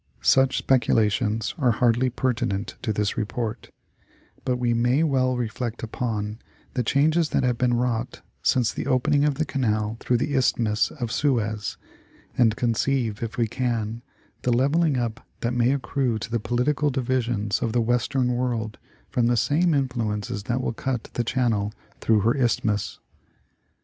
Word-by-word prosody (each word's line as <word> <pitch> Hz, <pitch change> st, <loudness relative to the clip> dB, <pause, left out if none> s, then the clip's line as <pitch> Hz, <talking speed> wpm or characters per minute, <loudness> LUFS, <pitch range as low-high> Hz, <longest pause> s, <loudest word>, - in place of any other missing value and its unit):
Such 135 Hz, 0 st, +4 dB
speculations 110 Hz, -3 st, +1 dB
are 125 Hz, -5 st, +3 dB
hardly 120 Hz, +2 st, +2 dB
pertinent 115 Hz, -5 st, -1 dB
to 110 Hz, -, -1 dB
this 105 Hz, -1 st, -1 dB
report, 110 Hz, 0 st, -3 dB, 0.7 s
but 125 Hz, -1 st, 0 dB
we 120 Hz, -1 st, +1 dB
may 120 Hz, +6 st, +2 dB
well 130 Hz, -4 st, +2 dB
reflect 120 Hz, 0 st, -3 dB
upon 110 Hz, -2 st, -3 dB, 0.3 s
the 125 Hz, -, 0 dB
changes 155 Hz, +6 st, +2 dB
that -, -, +1 dB
have 125 Hz, -2 st, +1 dB
been 125 Hz, -1 st, +2 dB
wrought 120 Hz, 0 st, -2 dB, 0.2 s
since 120 Hz, -3 st, +2 dB
the -, -, -4 dB
opening 145 Hz, +3 st, +2 dB
of 145 Hz, -2 st, +1 dB
the 155 Hz, +3 st, -1 dB
canal 110 Hz, -6 st, -1 dB
through 125 Hz, -, +1 dB
the 145 Hz, +4 st, -1 dB
Isthmus 115 Hz, -4 st, +2 dB
of 120 Hz, -6 st, -5 dB
Suez, 110 Hz, -7 st, 0 dB, 0.6 s
and 115 Hz, -3 st, +3 dB
conceive, 120 Hz, -2 st, 0 dB
if 115 Hz, -1 st, -4 dB
we 115 Hz, -2 st, +2 dB
can, 115 Hz, -2 st, -2 dB, 0.4 s
the 125 Hz, -, 0 dB
level 140 Hz, +8 st, +3 dB
ing 150 Hz, -5 st, +2 dB
up 115 Hz, -2 st, -3 dB, 0.2 s
that 120 Hz, +1 st, 0 dB
may 120 Hz, +1 st, +3 dB
accrue 130 Hz, -3 st, 0 dB
to 115 Hz, +2 st, -6 dB
the 120 Hz, -, +1 dB
political 125 Hz, +7 st, +1 dB
divisions 120 Hz, -5 st, -1 dB
of 115 Hz, -, 0 dB
the 120 Hz, -, +1 dB
western 125 Hz, +2 st, +1 dB
world 120 Hz, -4 st, -2 dB, 0.3 s
from 120 Hz, -2 st, +2 dB
the 120 Hz, 0 st, +2 dB
same 155 Hz, +7 st, +2 dB
influences 110 Hz, -7 st, -2 dB
that 125 Hz, +1 st, -1 dB
will 125 Hz, -, -2 dB
cut 125 Hz, 0 st, -3 dB
the 120 Hz, -, 0 dB
channel 110 Hz, -4 st, 0 dB, 0.3 s
through 110 Hz, -2 st, +3 dB
her 115 Hz, +4 st, +3 dB
Isthmus. 115 Hz, -5 st, 0 dB
120 Hz, 160 wpm, -24 LUFS, 110-130 Hz, 0.7 s, Such